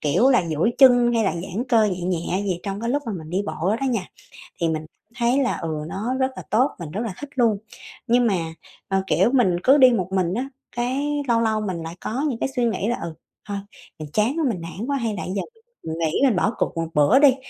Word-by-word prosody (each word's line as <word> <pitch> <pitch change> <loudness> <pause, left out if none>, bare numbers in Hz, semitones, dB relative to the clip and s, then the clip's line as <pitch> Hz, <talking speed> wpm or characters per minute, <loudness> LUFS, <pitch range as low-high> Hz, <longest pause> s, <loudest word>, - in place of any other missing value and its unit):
kiểu, 155 - +3
là 250 -7 +4
duỗi 165 +9 +1
chân 245 -3 +6
hay 230 -2 +2
là 195 - +1
giãn 190 +7 -4
cơ 225 -3 +5
nhẹ 185 -4 -1
nhẹ 180 +2 -1
gì 185 -3 -1
trong 200 0 -4
cái 230 +1 -2
lúc 290 +3 0
mà 225 - -2
mình 160 -5 -7
đi 185 +3 0
bộ 190 +5 -1
đó - - -1
nha. 230 -6 0 0.6
Thì 165 - +2
mình 155 -1 -2 0.3
thấy 240 +2 +2
là, 250 - 0
ừ, 165 - -4 0.2
nó 215 +9 -3
rất 260 0 +1
là - - -7
tốt, 250 +6 +3
mình 165 -3 -6
rất 205 - -3
là 230 -5 -3
thích 290 - -6
luôn. 230 -5 +3 0.5
Nhưng 240 0 +4
mà, 205 - +2 0.5
ờ, 195 0 0
kiểu 235 - +3
mình 200 -10 +3
cứ 270 +3 +6
đi 260 -3 +7
một 190 -7 0
mình 185 -2 +1
á, 255 +6 -2 0.3
cái 275 +5 -1
lâu 230 -1 +3
lâu 220 -1 +1
mình 185 -5 -3
lại 165 +1 -7
có 245 +5 -2
những 230 - -4
cái - - -1
suy 245 -2 +2
nghĩ 210 -3 -1
là 240 - -1
"Ừ, 170 -1 -5 0.4
thôi 200 - -2 0.4
mình 155 -1 -7
chán 225 +8 +1
quá - - +1
mình 190 -7 -3
nản 175 +8 -6
quá 280 0 0
hay 230 -5 -2
là 195 - -4
giờ 195 +2 -2 0.4
nghĩ 160 0 -1
nên 255 -6 +4
bỏ 195 +4 +2
cuộc - - -1
một 165 0 -1
bữa 150 - +5
đi." 280 -3 +6
215 Hz, 250 wpm, -23 LUFS, 180-245 Hz, 0.6 s, đi